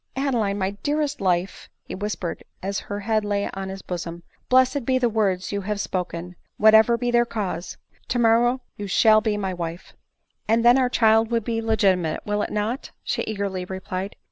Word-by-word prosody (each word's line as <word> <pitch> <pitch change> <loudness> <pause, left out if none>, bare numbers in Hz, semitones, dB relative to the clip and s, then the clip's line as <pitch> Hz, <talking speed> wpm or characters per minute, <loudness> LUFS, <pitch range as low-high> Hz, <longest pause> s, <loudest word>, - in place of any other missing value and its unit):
" - - -40
Adeline! 215 -6 0
my 190 -1 -1
dearest 295 0 -1
life 180 0 -1
!" - - -53
he - - -6
whispered 195 -3 -4 0.2
as 195 +1 -2
her 205 0 -3
head 215 +1 +1
lay 205 -1 -1
on 195 0 -5
his 190 0 -7
bosom, 170 -1 -5
" - - -41
blessed 260 +2 +4
be 260 +2 +2
the 250 -1 +2
words 200 -4 0
you 200 0 -2
have 205 +1 -3
spoken, 180 -2 -4 0.2
whatever 220 +2 +6
be 245 0 -1
their 240 0 +4
cause! 195 -7 -4 0.3
Tomorrow 240 +1 +3 0.2
you 205 - -5
shall 215 +3 +5
be 215 -1 0
my 190 -2 -2
wife." 170 0 -6 0.3
" - - -48
And 230 +1 +3
then 245 +2 +7
our 255 -1 +2
child 225 -2 +4
will 235 -1 +2
be 225 +1 -2
legitimate, 195 -7 +1
will 210 0 0
he - - -3
not?" 215 +6 -2
she - - -1
eagerly 200 -3 -3
replied. 190 +1 -5
210 Hz, 195 wpm, -23 LUFS, 190-230 Hz, 0.3 s, then